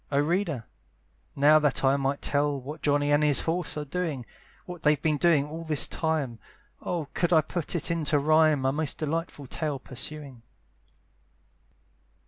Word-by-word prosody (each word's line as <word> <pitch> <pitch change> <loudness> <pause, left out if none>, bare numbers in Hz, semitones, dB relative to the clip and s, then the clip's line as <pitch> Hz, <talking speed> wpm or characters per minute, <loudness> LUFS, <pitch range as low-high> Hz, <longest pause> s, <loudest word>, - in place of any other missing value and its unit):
Oh 140 - +1
reader! 160 - 0 0.7
now 150 +2 +6
that 145 -3 +1
I 135 +1 +4
might 140 0 -2
tell 145 -1 +1
What 145 +4 -8
Johnny 145 0 +1
and 145 +1 +3
his 145 -2 +4
horse 170 0 -2
are 150 - -3
doing! 150 -5 -3 0.4
What 175 -2 -9
they've 150 -3 +3
been 155 0 0
doing 155 -3 +3
all 160 +2 -7
this 155 -3 +1
time, 150 -8 -2 0.4
Oh 165 -5 -3
could 175 0 0
I 160 -2 +6
put 170 +2 -3
it 170 - -1
into 155 -3 +1
rhyme, 155 -1 +3
A 135 - +3
most 150 0 -2
delightful 160 -1 -3
tale 150 +2 -3
pursuing! 135 0 -6
150 Hz, 160 wpm, -27 LUFS, 140-160 Hz, 0.7 s, now